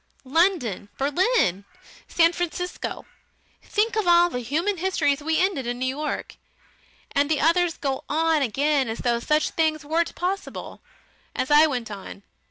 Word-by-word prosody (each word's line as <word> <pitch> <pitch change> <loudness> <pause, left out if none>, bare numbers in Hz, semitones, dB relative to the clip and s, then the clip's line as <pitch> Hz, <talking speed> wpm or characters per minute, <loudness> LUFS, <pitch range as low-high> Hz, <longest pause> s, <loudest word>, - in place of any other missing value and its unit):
London! 270 - +1
Berlin! 285 - +1 0.4
San 335 0 +3
Francisco! 355 +1 -4 0.6
Think 440 +2 0
of 430 -4 0
all 345 0 +5
the 250 - -3
human 320 - -1
histories 315 -6 0
we 320 +2 0
ended 360 -10 0
in 245 0 -2
New 255 - -2
York!... 290 +4 -4 0.7
And 285 0 +1
the 315 - +1
others 335 +2 +2
go 270 -2 -3
on 320 0 +2
again 275 +1 +1
as 225 - -4
though 235 -1 0
such 300 +5 +1
things 310 -2 0
weren't 330 +3 0
possible. 380 +2 -4 0.5
As 260 - -2
I 300 +2 +7
went 245 -6 -4
on! 200 0 -9
310 Hz, 150 wpm, -24 LUFS, 265-345 Hz, 0.7 s, I